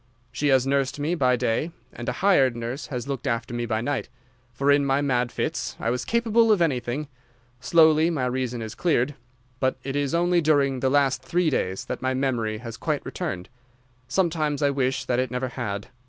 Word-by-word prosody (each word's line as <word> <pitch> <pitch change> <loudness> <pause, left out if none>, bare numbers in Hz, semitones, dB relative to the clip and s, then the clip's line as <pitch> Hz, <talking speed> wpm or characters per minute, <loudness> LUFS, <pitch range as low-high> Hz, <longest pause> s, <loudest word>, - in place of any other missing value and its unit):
She 145 - -1
has 130 -2 +4
nursed 135 0 0
me 150 +4 0
by 130 -7 +3
day 125 +5 0 0.2
and 120 - -5
a 125 +10 -3
hired 135 -11 +4
nurse 120 +3 -5
has 125 -1 -5
looked 140 -1 -4
after 115 -1 -2
me 120 0 -2
by 110 -1 0
night, 140 0 -2 0.4
for 140 +4 +1
in 140 0 +4
my 135 0 +2
mad 125 -4 0
fits - - -3
I 115 - 0
was 125 - -2
capable 230 -1 +3
of 210 - +4
anything. 140 -2 0 0.5
Slowly 160 0 +5
my 150 -7 -1
reason 125 -1 -2
has 110 -1 -5
cleared, 150 -5 +1 0.5
but 130 -1 +1
it 135 +1 -4
is 145 +2 0
only 175 0 +3
during 140 -4 +2
the 130 - +1
last 135 -2 +2
three 165 +5 +1
days 95 -7 -1
that - - -5
my 130 0 0
memory 120 -5 -1
has 115 0 -8
quite - - -2
returned. 90 0 -4 0.6
Sometimes 155 -5 0
I 140 - +3
wish 130 -1 -1
that 125 0 0
it 130 -1 0
never 125 +1 -2
had. 105 -3 -4
135 Hz, 200 wpm, -25 LUFS, 125-150 Hz, 0.6 s, Slowly